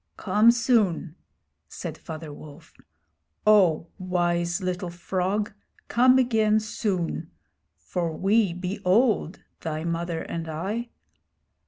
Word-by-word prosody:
'Come 215 +3 +4
soon!' 225 - +2 0.6
said - - -6
Father 160 -2 -8
Wolf. 155 +2 -13 0.7
'Oh, 190 -7 +5
wise 175 -1 0
little 180 -1 -3
frog, 185 +4 -2 0.4
come 255 +2 +5
again 220 -4 +3
soon; 205 -7 -2 0.5
for 170 -3 -3
we 200 0 +3
be 180 +4 -4
old, 200 -2 +2 0.2
thy 155 -1 -4
mother 170 0 -2
and 165 -1 -5
I.' 200 +10 -3
185 Hz, 105 wpm, -25 LUFS, 170-215 Hz, 0.7 s, Oh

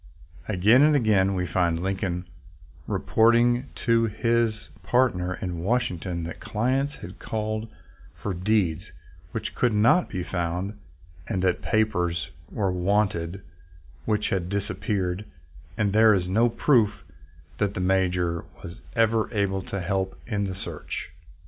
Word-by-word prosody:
Again 110 +5 +5
and 150 0 +5
again 100 -7 +3
we 90 -1 0
find 85 0 0
Lincoln 95 -2 -2 0.6
reporting 120 +3 +3 0.2
to 115 -1 +4
his 115 +1 +1 0.3
part 125 -3 +2
ner 90 +1 -2
in 90 -2 -4
Washington 90 -4 -1
that 85 0 -6
clients 130 +6 -1
had 90 +2 -9
called 110 0 -3 0.5
for 100 - -4
deeds 90 -3 +1 0.5
which - - -4
could 120 -2 +1
not 115 +12 +4
be 90 - -3
found, 90 +4 -3 0.5
and 95 -1 -1
that 90 -1 +1
papers 90 -6 0 0.2
were 100 -3 -1
wanted 95 -1 0 0.6
which 105 -1 0
had 90 -2 -1
disappeared, 95 -1 -2 0.5
and 105 -2 +1
there 110 0 +6
is 90 -2 -1
no 115 +6 +3
proof 110 -5 +2 0.6
that 100 -1 0
the - - -2
Major 90 -2 +1 0.2
was 85 +4 -8 0.2
ever 115 -1 +2
able 100 -3 0
to 100 +1 -5
help 95 +2 -2
in 105 -4 -1
the 95 -1 -4
search. - - -6
100 Hz, 135 wpm, -25 LUFS, 90-110 Hz, 0.6 s, there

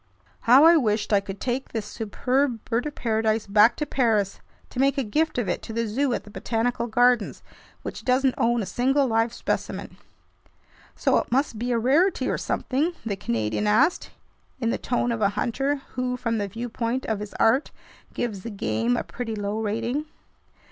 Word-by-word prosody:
How 260 +4 +8
I 335 +1 +8
wished 215 -6 0
I 200 - +6
could 195 0 -8
take 255 +3 -2
this 220 -3 -4
superb 245 +3 -1
bird 240 +4 -1
of 295 - -7
paradise 220 -1 0
back 210 +3 +5
to 300 - -2
Paris, 220 -8 +1 0.3
to 250 - -5
make 275 +1 +3
a 275 - +1
gift 310 +8 0
of 240 -5 0
it - - -1
to 225 - -8
the 230 +1 0
zoo 260 +5 0
at - - -5
the 210 - -14
Botanical 230 +3 -1
Gardens, 240 -1 +2 0.4
which - - -6
doesn't 260 +1 +2
own 235 -1 +1
a - - -4
single 270 +6 +2
live 225 -1 +1
specimen. - - -4 1.0
"So - - +2
it - - -5
must 255 -3 0
be 245 +2 -1
a 235 - +2
rarity 290 - +2
or - - -1
something?" 295 +7 -1
the 210 -3 -1
Canadian 115 - -1
asked, 250 +11 +3 0.5
in 230 -2 0
the - - -2
tone 245 0 0
of 230 -2 -2
a 200 - +4
hunter 270 +3 -1
who, 250 -1 -2
from 230 -2 -1
the 205 - -1
viewpoint 230 +3 -3
of 220 -2 -1
his 210 -1 -7
art, 255 +6 +3 0.4
gives 215 -5 -3
the 230 - -6
game 115 - 0
a - - -1
pretty 225 -3 -5
low 205 +1 -2
rating. 230 +7 -2
230 Hz, 190 wpm, -25 LUFS, 215-260 Hz, 1.0 s, How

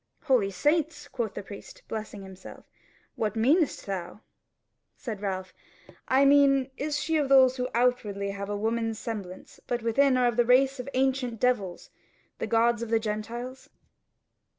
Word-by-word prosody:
"Holy 255 -9 +2
Saints!" 295 - 0
quoth 235 -6 -4
the - - -5
priest, 200 +1 -11
blessing 215 -2 -6
himself, 190 -1 -12 0.5
"what 215 -1 -2
meanest 280 +8 +2
thou?" 195 +1 -5 0.8
Said 220 -6 -6
Ralph: 190 -2 -4 0.5
"I 270 +2 +4
mean, 275 -1 +4
is 295 +1 -2
she 320 +1 0
of 290 -3 0
those 260 -1 +6
who 250 0 -2
outwardly 215 -5 0
have 200 0 -6
a 205 - -2
woman's 225 +1 -1
semblance, 200 -6 -7
but 240 -2 -2
within 255 +3 +3
are 250 - +3
of 240 -2 +1
the 240 - +5
race 265 +2 +4
of 250 - -6
the 275 - -4
ancient 260 -3 0
devils, 210 -8 -1 0.5
the - - -2
gods 230 +1 +2
of 235 - -4
the 225 0 +3
Gentiles?" 235 +4 -5
235 Hz, 160 wpm, -27 LUFS, 210-265 Hz, 0.8 s, those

